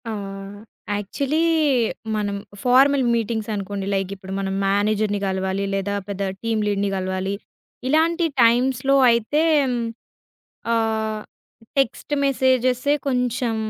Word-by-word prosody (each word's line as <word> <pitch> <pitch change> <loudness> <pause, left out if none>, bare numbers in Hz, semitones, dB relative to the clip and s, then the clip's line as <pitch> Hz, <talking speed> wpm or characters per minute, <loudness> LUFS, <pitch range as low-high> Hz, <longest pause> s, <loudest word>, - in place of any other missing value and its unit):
ఆహ్, 195 -2 -6 0.4
యాక్చువలీ 275 +10 -1 0.7
మనం 205 -1 -1 0.3
formal 270 +2 +5
meetings 225 -1 -2
అనుకోండి. 200 0 -4
లైకిప్పుడు 195 0 -4
మనం 195 -1 -2
మేనేజర్‌ని 205 +1 +1
గలవాలి, 190 +1 -1
లేదా 195 +1 -1
పెద్ద 200 -1 -2
టీమ్ 225 -1 0
లీడ్‌ని 200 -1 0
గలవాలి. 190 +1 -2 0.5
ఇలాంటి 330 +4 +2 0.2
టైమ్స్‌లో 255 +3 +3 0.2
అయితే 235 +6 +1 0.2
హ్మ్, 250 -2 -1 1.0
ఆహ్, 220 -1 0 0.6
టెక్స్ట్ 270 +2 -1
మెసేజె‌సే 260 0 +2
కొంచెం 250 -2 0
220 Hz, 100 wpm, -22 LUFS, 200-255 Hz, 1.0 s, formal